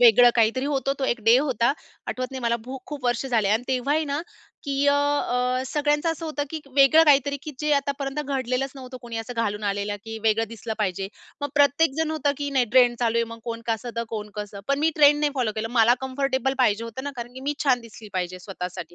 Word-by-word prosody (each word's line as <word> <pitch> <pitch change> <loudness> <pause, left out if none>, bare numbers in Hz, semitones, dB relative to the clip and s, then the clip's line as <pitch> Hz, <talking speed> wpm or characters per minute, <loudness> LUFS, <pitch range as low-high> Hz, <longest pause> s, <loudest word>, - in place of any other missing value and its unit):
वेगळं 245 0 +8
काहीतरी 230 +3 +2
होतं, 275 -1 0
तो 270 - -1
एक 240 -2 0
डे 225 +2 +7
होता. 260 -3 +1 0.3
आठवतं 255 0 -3
नाही 265 - -6
मला 235 0 +1
खूप-खूप 265 +2 -8
वर्ष 245 +1 0
झाले 225 -6 +1
आणि 220 +3 +2
तेव्हाही 275 +5 +1
ना 285 0 -2 0.4
की 280 0 0
अ, - - +5
अ 255 -3 +1
सगळ्यांचं 295 +3 +1
असं 325 +1 -5
होतं 300 -2 -2
की 320 -1 -4 0.2
वेगळं 280 +4 +7
काहीतरी 285 -1 +4
की 305 - -6
जे 300 - 0
आतापर्यंत 280 0 -1
घडलेलंच 265 -1 -1
नव्हतं, 255 -1 -9
कोणी 235 -1 -6
असं 225 +2 -5
घालून 210 -1 -2
आलेलं 205 +1 -1
की 225 0 -6
वेगळं 225 0 +2
दिसलं 230 0 -6
पाहिजे. 195 -2 -1 0.3
मग 285 - -2
प्रत्येक 285 +2 +4
जण 320 -1 +1
होतं 290 -2 0
की 285 0 -2
नाही 265 -3 +3
ट्रेंड 245 -2 +5
चालू 230 -1 +1
आहे, 230 - +2
मग 230 - -9
कोण 230 -1 -4
कसं, 230 +1 -2
तर 230 - -1
कोण 210 -2 -5
कसं? 205 -1 -6
पण 280 0 +2
मी 315 +2 +3
ट्रेंड 295 -1 +6
नाही 295 -1 +2
फॉलो 245 -5 0
केलं, 220 +1 -2
मला 235 0 +5
कम्फर्टेबल 265 0 -1
पाहिजे 230 -3 +2
होतं 230 +3 -7
ना, 285 - -3
कारण 240 0 -6
की 260 - -8
मी 285 +2 -2
छान 255 -3 +3
दिसली 225 -1 -12
पाहिजे 185 -1 -3
स्वतःसाठी. 180 -3 -7
255 Hz, 225 wpm, -24 LUFS, 225-280 Hz, 0.4 s, वेगळं